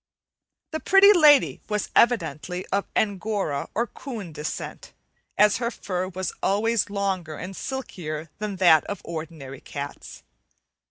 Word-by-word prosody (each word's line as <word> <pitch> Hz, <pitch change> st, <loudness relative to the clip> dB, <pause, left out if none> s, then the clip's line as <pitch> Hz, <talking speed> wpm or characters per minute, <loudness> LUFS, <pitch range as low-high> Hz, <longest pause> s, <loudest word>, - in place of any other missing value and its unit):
The 315 Hz, -, -2 dB
Pretty 390 Hz, +4 st, +7 dB
Lady 300 Hz, -6 st, +5 dB
was 210 Hz, -1 st, -2 dB
evidently 180 Hz, -, +1 dB
of 200 Hz, +1 st, 0 dB
Angora 200 Hz, -7 st, -1 dB
or 230 Hz, +3 st, +1 dB
coon 225 Hz, -, -8 dB
descent, 150 Hz, 0 st, -6 dB, 0.4 s
as 210 Hz, -1 st, +5 dB
her 235 Hz, -1 st, -1 dB
fur 185 Hz, -5 st, -3 dB
was 185 Hz, 0 st, -4 dB
always 220 Hz, +3 st, +1 dB
longer 190 Hz, -6 st, -2 dB
and 185 Hz, +5 st, -7 dB
silkier 165 Hz, -, -5 dB
than 210 Hz, -2 st, -3 dB
that 175 Hz, -4 st, +6 dB
of 205 Hz, -, -6 dB
ordinary 155 Hz, -5 st, -7 dB
cats. 140 Hz, 0 st, -8 dB
195 Hz, 125 wpm, -25 LUFS, 165-225 Hz, 0.4 s, Pretty